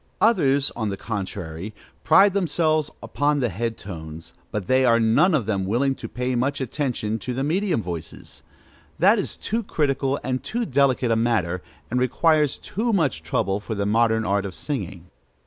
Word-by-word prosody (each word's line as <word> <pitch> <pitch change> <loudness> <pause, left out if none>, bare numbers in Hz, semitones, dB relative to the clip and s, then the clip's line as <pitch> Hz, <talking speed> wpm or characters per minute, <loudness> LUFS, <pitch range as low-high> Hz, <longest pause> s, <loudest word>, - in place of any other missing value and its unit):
Others, 145 -11 +3
on 110 -3 -2
the 100 - -4
contrary, 100 -2 -5 0.3
pride 190 +5 +6
themselves 160 -5 +1
upon 145 0 0
the 125 -3 +1
head 115 +4 -3
tones; 80 -4 -9 0.2
but 105 -3 -3
they 130 +4 +3
are 115 -2 +4
none 145 +11 +4
of 130 -8 0
them 100 -3 -1
willing 120 +8 +1
to - - -8
pay 125 0 -2
much 135 +4 0
attention 125 -5 -2
to 125 +4 -4
the 135 - -1
medium 170 - 0
voices: 85 -3 -7 0.6
that - - +5
is - - -3
too 225 +3 -2
critical 140 - 0
and 130 0 -2
too 235 +1 -2
delicate 135 - +2
a - - +4
matter, 105 -7 0 0.3
and 125 - +1
requires 150 +3 +2
too 230 +4 -2
much 155 - +1
trouble, 95 +5 -1
for 110 +1 -5
the 100 0 -1
modern 110 +1 +2
art 100 -1 +1
of 95 -2 -6
singing. 95 - -5
125 Hz, 175 wpm, -23 LUFS, 100-145 Hz, 0.6 s, pride